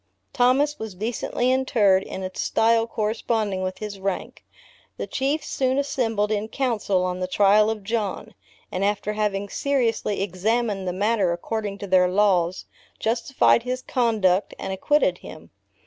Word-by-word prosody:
Thomas 275 +4 +2
was 220 -4 -6
decently 235 +4 -1
interred 225 -8 +3
in 190 0 -7
a 185 - -4
style 225 0 +2
corresponding 215 -2 -1
with 185 0 -3
his 210 -2 -6
rank. 195 -1 -4 0.5
The - - -3
Chiefs 280 +3 -2
soon 260 0 0
assembled 225 -7 0
in 210 0 -1
council 220 -7 0
on 180 0 -3
the 185 - -2
trial 205 +3 +4
of 220 -2 -4
John, 210 -2 -3 0.4
and 185 - -2
after 205 +1 0
having 205 -2 -1
seriously 230 -5 0
examined 200 +1 -1
the - - 0
matter 200 0 +1
according 205 +3 -4
to 200 - -6
their 185 -1 +4
laws, 185 -2 +1 0.3
justified 235 +2 +2
his 255 +1 -4
conduct, 210 -6 +1
and 190 - -4
acquitted 190 -2 +1
him. 155 - -12
210 Hz, 145 wpm, -24 LUFS, 190-235 Hz, 0.5 s, trial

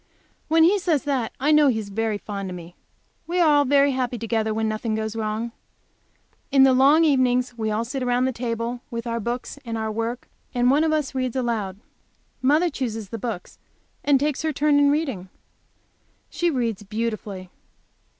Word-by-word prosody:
When 320 +1 +4
he 390 +5 +4
says 335 -7 +1
that 265 -6 -1
I 290 +4 +2
know 300 -1 +6
he 250 -5 +2
is 210 -2 -5
very 220 +1 -1
fond 200 -2 -6
of 180 - -6
me. 175 0 -11 0.5
We 355 +2 -1
are 340 - +5
all 290 -1 +4
very 280 +1 +4
happy 255 -2 -2
together 225 -1 -1
when 220 0 -1
nothing 215 +1 -2
goes 220 0 -3
wrong. 220 +1 -2 1.0
In 275 -1 +6
the 265 -1 +6
long 280 +5 +5
evenings 250 -4 +2
we 220 -2 -2
all 215 +2 -1
sit 265 +3 -4
around 245 0 +1
the 260 - +1
table 235 0 -3
with 235 -2 -5
our 235 0 -2
books 240 +5 -4
and 230 -2 -4
our 220 0 -2
work, 230 +3 -3 0.3
and 245 +1 +3
one 295 +3 +3
of 320 - +2
us 305 -3 -1
reads 255 -2 -2
aloud. 225 -7 -2 0.6
Mother 305 +6 +3
chooses 225 -7 -4
the 230 - -5
book 215 -5 -4 0.6
and 285 -2 +4
takes 290 0 -1
her 315 0 0
turn 290 0 +2
in 285 0 +5
reading. 270 - -1 1.0
She 345 - 0
reads 235 - -1
beautifully. 210 -3 -4
245 Hz, 190 wpm, -23 LUFS, 220-280 Hz, 1.0 s, know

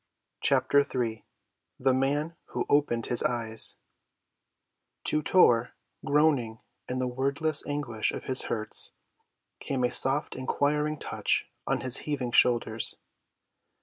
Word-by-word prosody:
CHAPTER 140 - +4
III 120 -5 -2 0.6
THE 130 0 +2
MAN 145 +5 -1
WHO - - -4
OPENED 130 -6 +1
HIS 120 - +5
EYES 115 -2 +1 1.3
To 155 - +2
Tor, 125 -10 +3 0.3
groaning 140 -6 +1 0.3
in 125 - -3
the 130 0 -1
wordless 140 +4 0
anguish 145 -7 -2
of - - -7
his 130 -1 -1
hurts, 110 -1 -2 0.7
came 130 -2 -3
a 125 - +1
soft 140 +3 +3
inquiring 150 +3 -1
touch - - -2 0.2
on - - -1
his 130 -1 +4
heaving 135 -5 -4
shoulders. 115 -2 +2
130 Hz, 115 wpm, -27 LUFS, 120-145 Hz, 1.3 s, HIS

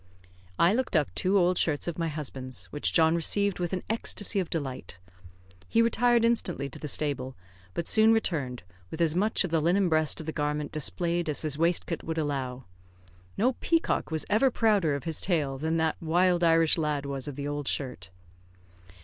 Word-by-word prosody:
I 170 +4 +4
looked 255 -4 -1
up 150 -3 +1
two 190 +2 +1
old 180 -1 +3
shirts 150 -1 0
of 170 0 -4
my 165 - 0
husband's, 135 -4 -5
which 145 - -1
John 160 -1 +4
received 200 +4 0
with 175 -1 -2
an 185 -2 -3
ecstacy 210 -2 0
of 180 - -2
delight. 135 - -5 0.7
He 230 - +3
retired 235 0 +3
instantly 185 -11 0
to - - -9
the 150 - -5
stable, 135 -3 -1 0.4
but 170 - -3
soon 220 0 +5
returned, 145 - -1 0.3
with 160 - -8
as 165 -1 +2
much 210 +5 +2
of 185 - -4
the 165 -1 +2
linen 180 +3 +2
breast 155 -1 +2
of 160 - -7
the 160 - -3
garment 150 -1 -2
displayed 170 +2 0
as 150 - -1
his 150 -2 -1
waistcoat 165 +1 0
would 160 0 -5
allow. 135 -4 -3 0.7
No 250 +6 +2
peacock 330 -1 0
was 160 -1 0
ever 225 +6 +3
prouder 205 - +2
of 140 - -5
his 160 0 -3
tail 145 -7 0
than 160 +2 -1
the 160 -1 +1
wild 175 +2 +2
Irish 165 0 +4
lad 150 -2 -1
was 140 -1 -4
of 145 - -6
the 145 +1 -4
old 145 -1 -4
shirt. 125 -10 -4
160 Hz, 190 wpm, -28 LUFS, 145-185 Hz, 0.7 s, soon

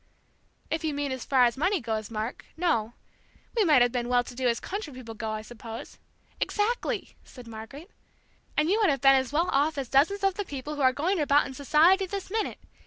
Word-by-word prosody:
"If 320 0 -1
you 310 -2 -1
mean 285 -1 -2
as 260 -2 -4
far 260 -2 +4
as 240 -1 +3
money 365 +7 +1
goes, 220 -4 -3
Mark, 220 +1 -5
no. 240 -11 0 0.6
We 450 - +4
might 300 -9 +6
have 245 - +1
been 240 -1 -2
well 245 0 +3
to 245 - -10
do 255 +1 -1
as 235 -1 +1
country 405 -5 -5
people 250 -3 -9
go, 220 0 -5
I 215 0 -4
suppose 230 0 -9 0.2
" - - -33
"Exactly!" 445 +3 -1
said 250 -2 -13
Margaret; 230 - -10 0.7
"and 305 +1 +3
you 405 +5 +2
would 415 - +4
have 275 -3 0
been 270 0 +7
as 265 -1 +1
well 330 +4 +1
off 295 +2 +2
as 270 -3 -3
dozens 360 +9 +3
of 390 -1 +3
the 410 - -3
people 290 -3 -6
who 295 - -4
are 260 -1 +5
going 340 +8 0
about 290 -1 +4
in 265 - -7
society 320 +8 +4
this 390 0 -5
minute! 440 0 -1
280 Hz, 225 wpm, -27 LUFS, 245-345 Hz, 0.7 s, been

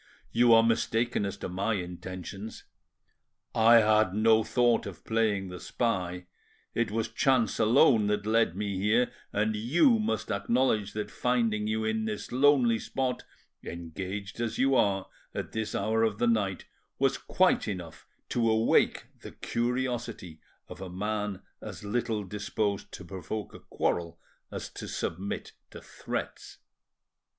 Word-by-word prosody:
You 120 0 +4
are 115 - +6
mistaken 115 -1 +1
as 100 - -5
to - - -5
my 100 +5 -1
intentions. 95 +3 -7 0.9
I 115 +1 +6
had 105 -3 +3
no 110 +1 +4
thought 120 -1 +2
of - - -10
playing 110 -4 0
the 90 0 -7
spy; 90 -6 -2 0.5
it 115 -2 0
was 110 +1 -1
chance 125 -2 +1
alone 110 0 +5
that 105 0 0
led 110 -5 +2
me 100 -1 -2
here; 110 +5 +2 0.2
and 110 +1 0
you 170 - +3
must 110 - -1
acknowledge 105 -1 +1
that 105 0 -4
finding 115 -4 0
you 110 0 -1
in 110 0 0
this 105 -1 -4
lonely 130 -3 +4
spot, 130 +1 -2 0.4
engaged 95 +5 -6
as 115 -1 -2
you 135 +1 +3
are 100 -6 +2 0.3
at - - -4
this 110 -1 -3
hour 110 +3 +1
of 110 -2 +1
the 120 - +1
night, 105 -5 0 0.3
was - - +1
quite - - +2
enough 90 -5 -6 0.2
to 115 -2 +1
awake 110 +1 +3 0.2
the - - -10
curiosity 120 -8 -3 0.3
of - - -10
a 95 - -6
man 105 +1 -3 0.2
as - - -8
little 110 0 -1
disposed 100 +1 -3
to 95 - -8
provoke 95 +3 -6
a - - -10
quarrel 85 -1 -2 0.3
as - - -5
to - - -8
submit 95 +4 -4 0.2
to - - -10
threats." - - -6
110 Hz, 145 wpm, -29 LUFS, 100-115 Hz, 0.9 s, are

